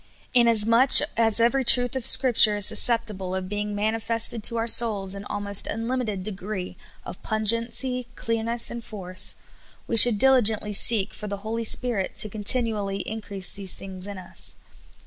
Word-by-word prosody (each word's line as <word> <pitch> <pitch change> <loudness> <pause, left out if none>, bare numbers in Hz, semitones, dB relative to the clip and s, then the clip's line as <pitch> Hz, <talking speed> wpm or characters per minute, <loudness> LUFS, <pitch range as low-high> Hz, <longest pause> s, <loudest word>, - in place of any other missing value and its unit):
Inasmuch 235 +1 +2 0.2
as 225 -1 +2
every 240 +4 +1
truth 245 +1 +3
of 260 -1 +2
Scripture 235 -4 +5
is 205 -1 -3
suscepti 230 -2 +2
ble 185 -1 -7
of 190 -1 -5
being 205 +1 -5
manifested 225 +1 0
to 235 - +2
our 225 - -2
souls 215 -5 +3
in 200 0 -9
almost 205 -1 -2
unlim 235 +4 -4
ited 210 -6 -6
degree 195 -1 -7 0.3
of - - -11
pungency, 230 +3 -1
clearness, 230 +1 -2
and 235 0 -8
force, 185 -4 -5 0.5
we - - -4
should 225 -1 +7
diligentl}^ 240 -5 +3
vSeek 210 0 0
for 210 - -9
the 200 0 -6
Holy 230 +1 -4
Spirit 225 -4 0
to 215 - +3
continually 210 -2 -2
in 220 +3 -7
i - - -13
crease 195 -3 -3
these 195 -2 -4
things 190 0 -10
in 200 -1 -9
us. 180 -2 -8
220 Hz, 165 wpm, -23 LUFS, 200-235 Hz, 0.5 s, should